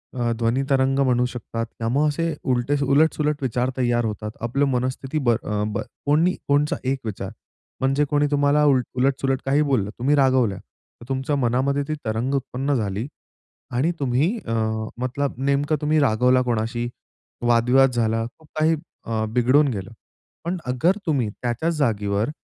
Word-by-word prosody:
अ, 120 -1 0
ध्वनी 120 +3 +1
तरंग 135 0 +2
म्हणू 125 -2 +3
शकतात. 115 -2 -4
त्यामुळं 125 +7 +1
असे 165 +2 -1 0.2
उलटे 125 +3 +1
उलट-सुलट 150 +1 +2
विचार 125 -1 0
तैयार 120 -2 +1
होतात. 105 0 -4
आपलं 130 +5 +1
मनस्थिती 130 +3 -2
बर 120 - +5
अ, 105 -1 -1
बर 105 - -2 0.2
कोणी 160 +6 +3
कोणचा 150 +3 +2
एक 135 0 0
विचार 95 -2 -4 0.5
म्हणजे, 135 +2 +2
कोणी 145 0 +2
तुम्हाला 145 +1 +3 0.3
उलट-सुलट 135 0 +1
काही 140 +3 +3
बोललं. 130 -9 +1
तुम्ही 140 +4 +3
रागवल्या. 130 -7 +3
तर 115 - -20
तुमच्या 135 +2 -1
मनामध्ये 135 +2 +1
ती 155 - -1
तरंग 115 +5 -1
उत्पन्न 135 +1 -1
झाली 105 0 -2 0.6
आणि 135 +8 +1
तुम्ही 140 - +1
अ, 115 - -2 0.5
मतलब 140 +2 -2
नेमकं 140 +3 +1
तुम्ही 155 +1 +2
रागवला 125 0 +3
कोणाशी, 120 0 -1 0.6
वाद-विवाद 125 +3 +4
झाला, 115 -1 +1
खूप 160 -1 -21
काही 160 +1 +3 0.3
अ, 110 -1 -1
बिघडून 130 +4 +4
गेलं. 100 -3 -4 0.5
पण 175 +2 -1
अगर 130 +10 +2
तुम्ही 135 -8 +1
त्याच्याच 125 +8 -1
जागेवर, 105 -3 0
130 Hz, 150 wpm, -23 LUFS, 120-145 Hz, 0.6 s, बर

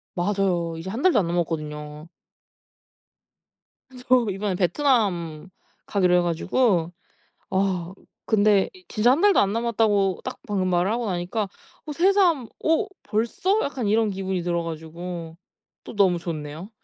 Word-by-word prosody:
맞아요. 175 -3 0
이제 175 +3 -6
1 230 +7 -4
달도 355 - +4
안 175 - 0
남았거든요. 155 -2 -4 2.0
저 250 -2 +4
이번에 195 +1 -2
베트남 185 - 0 0.4
가기로 180 -3 +2
해 - - +4
가지고 175 +1 +1 0.6
아 190 -2 -1 0.3
근데 205 -2 +3
이 370 - -17
진짜 235 +2 +2
1 285 - +1
달도 405 +1 +5
안 200 0 +2
남았다고 215 -4 +1
딱 - - -5
방금 190 -3 0
말하고 195 +7 +1
나니까 185 +3 -2 0.4
어 300 - -4
새삼 345 - +3 0.2
'어 325 +6 +2 0.2
벌써?' 235 - 0
약간 265 -5 -3
이런 215 +1 +2
기분이 190 -2 -3
들어 170 -1 -1
가지고 165 +1 -7 0.5
또 - - -9
너무 190 -4 +3
좋네요. 160 +3 -6
195 Hz, 260 characters per minute, -24 LUFS, 170-230 Hz, 2.0 s, 달도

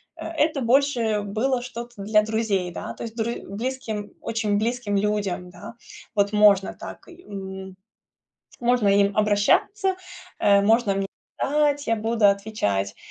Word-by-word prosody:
Э, - - -7
это 310 -3 0
больше 235 -4 +2
было 240 +5 -1
что-то 240 -3 -8
для 215 +1 +4
друзей, 215 -4 -1
да, - - -6
то - - -13
есть 225 -1 -6
друзь 235 0 -2
близким, 220 -1 -4
очень 220 -3 -1
близким 230 -2 -1
людям, 200 -3 -1
да. 180 +5 -10 0.4
Вот 200 0 +1
можно 205 -2 +4
так, - - -9
и 360 0 -15
м 190 -1 -8 0.8
можно 240 -3 +2
им 200 0 +3
обращаться, 215 - +2 0.5
э, 200 -1 +5
можно 220 0 +3
мне 195 0 -1 0.3
ать 290 0 +1
я 230 - +2
буду 225 0 +2
отвечать. 200 - 0
215 Hz, 140 wpm, -24 LUFS, 200-240 Hz, 0.8 s, э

